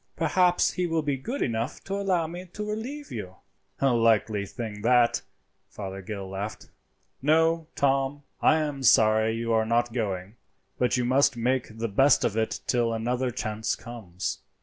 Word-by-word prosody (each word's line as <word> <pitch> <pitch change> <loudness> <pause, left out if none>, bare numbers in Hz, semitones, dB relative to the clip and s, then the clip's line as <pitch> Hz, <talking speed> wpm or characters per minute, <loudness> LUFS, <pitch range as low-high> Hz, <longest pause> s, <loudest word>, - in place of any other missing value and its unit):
Perhaps 180 -2 +3
he 180 -1 -1
will 165 -1 0
be 145 -2 0
good 235 - -3
enough 115 0 -3
to 195 - -5
allow 190 -4 +1
me 175 +3 -7
to 210 0 -5
relieve 255 +8 -5
you." 95 -5 -6 0.5
"A 135 -2 +4
likely 110 -3 +2
thing 110 -3 -6
that!" 120 +1 +3 0.5
Fothergill 95 0 -6
laughed. 100 +3 -6 0.5
"No, 160 +3 +3
Tom, 135 +1 +1 0.2
I - - +5
am 150 -3 -2
sorry 110 -2 +4
you 115 0 -1
are 110 0 +3
not 120 +1 +1
going, 100 -2 -3 0.4
but 125 0 +2
you 125 - 0
must 130 +1 +3
make 125 -1 -1
the 115 +1 -1
best 135 +6 +4
of 105 - 0
it 110 0 -1
till 120 -2 +1
another 125 +3 -1
chance 110 -3 -2
comes." 95 -7 -6
120 Hz, 160 wpm, -27 LUFS, 110-145 Hz, 0.5 s, I